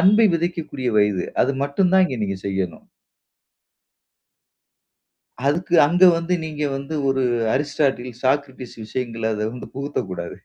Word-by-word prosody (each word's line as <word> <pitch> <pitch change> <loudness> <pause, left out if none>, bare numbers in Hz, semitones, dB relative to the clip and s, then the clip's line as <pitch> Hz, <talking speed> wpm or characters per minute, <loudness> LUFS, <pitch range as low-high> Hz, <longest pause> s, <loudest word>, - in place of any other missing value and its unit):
அன்பை 210 +5 +6
விதைக்கக்கூடிய 165 -6 -2
வயது. 105 -3 +2 0.2
அது 135 - +1
மட்டும் 180 +6 +1
தான் 190 0 +6
இங்க 130 -7 -5
நீங்க 100 -2 -2
செய்யணும். 95 -4 -3 2.6
அதுக்கு 170 +4 0
அங்க 175 +5 +4
வந்து 170 +2 -1
நீங்க 150 -1 -4
வந்து 140 +3 -6
ஒரு 135 0 +1 0.3
அரிஸ்டாட்டில், 135 -3 0
சாக்ரடிஸ் 130 -2 -1
விஷயங்களை 115 -1 -3
அத 105 - -3
வந்து 125 - -8
புகுத்த 140 +2 -4
கூடாது. 85 -1 -6
135 Hz, 125 wpm, -22 LUFS, 120-165 Hz, 2.6 s, அன்பை